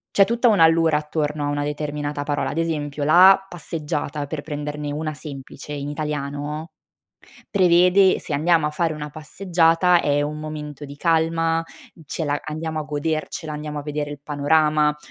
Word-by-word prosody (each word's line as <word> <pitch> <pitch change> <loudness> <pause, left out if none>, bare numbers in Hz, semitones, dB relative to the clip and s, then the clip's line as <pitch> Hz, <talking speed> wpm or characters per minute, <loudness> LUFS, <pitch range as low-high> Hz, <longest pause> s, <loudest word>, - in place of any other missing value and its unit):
c'è 195 - +6
tutta 235 +2 +2
un' 210 - +3
allure 165 -1 +5
attorno 150 -1 -2
a - - -1
una 145 0 -1
determinata 145 0 -3
parola, 145 0 -1
ad - - -5
esempio 150 -3 -2
la 185 +5 +7
passeggiata, 150 -4 -4
per 150 0 -4
prenderne 150 0 -5
una 155 +1 -3
semplice 140 -2 -9
in 145 -1 -4
italiano, 150 +1 -4 0.8
prevede 180 0 +5
se - - -6
andiamo 160 +2 +3
a - - +1
fare 160 +1 -1
una 150 -1 -6
passeggiata 170 +2 +2
è 145 -2 +1
un 150 +1 -3
momento 150 -1 -7
di 140 0 -10
calma, 165 +1 +1 0.4
ce 160 - -4
la 145 -1 -1
andiamo 155 +1 -4
a - - -3
godercela, 155 +1 -3
andiamo 150 0 -5
a - - -5
vedere 150 0 -3
il 145 -1 -8
panorama. 150 +1 +2
150 Hz, 165 wpm, -22 LUFS, 145-165 Hz, 0.8 s, la